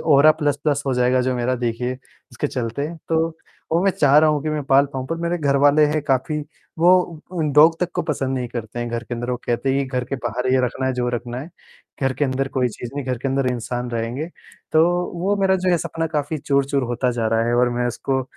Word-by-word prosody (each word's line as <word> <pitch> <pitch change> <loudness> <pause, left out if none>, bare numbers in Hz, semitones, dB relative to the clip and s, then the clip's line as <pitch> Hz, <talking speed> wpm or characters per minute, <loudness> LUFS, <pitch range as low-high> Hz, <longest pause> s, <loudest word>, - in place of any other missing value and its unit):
Aura 150 0 +7
plus 150 -3 0
plus 145 -1 +1
हो 135 - +1
जाएगा 125 +1 +3
जो 130 0 0
मेरा 125 +1 0
देखिए 125 +1 -2
इसके 130 - -7
चलते 125 +4 -3 0.2
तो 165 0 +2 0.4
वो 170 +2 +3
मैं 195 - +5
चाह 145 -5 +3
रहा 155 0 +5
हूँ 150 -1 0
कि 155 - -2
मैं 150 -1 -2
पाल 140 +1 +4
पाऊँ 130 -1 -4
पर 165 - -3
मेरे 170 +1 0
घरवाले 145 0 +4
हैं 150 +1 0
काफ़ी 140 +2 0 0.4
वो 170 - +4 0.4
अ, 175 - -3
डॉग 160 +2 +6
तक 180 - 0
को - - 0
पसंद 135 -5 -2
नहीं 125 -1 -3
करते 115 -1 -6
हैं 120 - -2
घर 120 0 -3
के 120 - -5
अंदर, 120 +1 -4
वो 125 - 0
कहते 120 +3 0
हैं 140 - +1
कि - - -8
घर 125 - 0
के 135 - -4
बाहर 125 0 -3
ही 130 - +4
रखना 130 +2 -2
है 130 - +1
जो 125 -1 -1
रखना 120 0 -4
है, 155 +6 -9 0.5
घर 135 0 +2
के 145 - 0
अंदर 135 0 -1
कोई 130 -2 0
चीज़ 120 +1 -8
नहीं 145 -1 -3
घर 125 -2 -1
के 135 - -2
अंदर 135 0 0
इंसान 120 0 -3
रहेंगे। 120 +6 -3 0.5
तो 155 - +6 0.4
वो 200 +3 +1
मेरा 195 -1 +3
जो 185 0 -1
ये 175 - +3
सपना 165 +1 -3
काफ़ी 150 0 -2
चूर-चूर 140 0 +1
होता 120 +1 0
जा 120 -2 -1
रहा 115 0 +1
है 120 - +1
और 125 0 +3
मैं 120 0 -1
इसको 130 +2 -1
135 Hz, 250 wpm, -21 LUFS, 125-150 Hz, 0.5 s, Aura